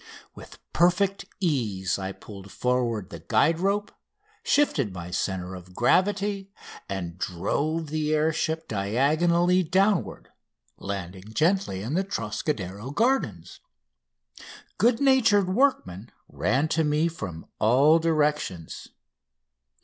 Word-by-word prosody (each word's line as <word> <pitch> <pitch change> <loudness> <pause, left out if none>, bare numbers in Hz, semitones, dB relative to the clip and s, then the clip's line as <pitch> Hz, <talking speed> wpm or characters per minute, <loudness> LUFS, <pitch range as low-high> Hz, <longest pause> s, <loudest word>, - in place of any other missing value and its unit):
With - - -13 0.2
perfect 190 +3 +2
ease 110 - -1
I 95 0 -4
pulled 100 -1 -12
forward 120 -5 -1
the 85 - -7
guide 160 - +2
rope, 200 +2 0 0.5
shifted 150 - +1
my 90 0 -7
centre 90 0 -2
of 90 0 -11
gravity, 195 - +1 0.4
and 90 -3 -5
drove 150 - -2
the 155 -1 -1
air 155 +1 +2
ship 160 0 -2
diagonally 155 - +2
downward, 190 +3 0 0.5
landing 95 +1 -6
gently 165 - +1
in 120 +7 -4
the 185 +4 +1
Trocadero 110 - -4
Gardens. 145 - -1 1.2
Good 230 +3 +3
natured 230 -9 +4
workmen 120 - 0 0.2
ran 140 +4 0
to 160 0 +1
me 150 +2 +2
from 95 - -7
all 140 +9 +5
directions. 150 - -1
150 Hz, 110 wpm, -26 LUFS, -, 1.2 s, all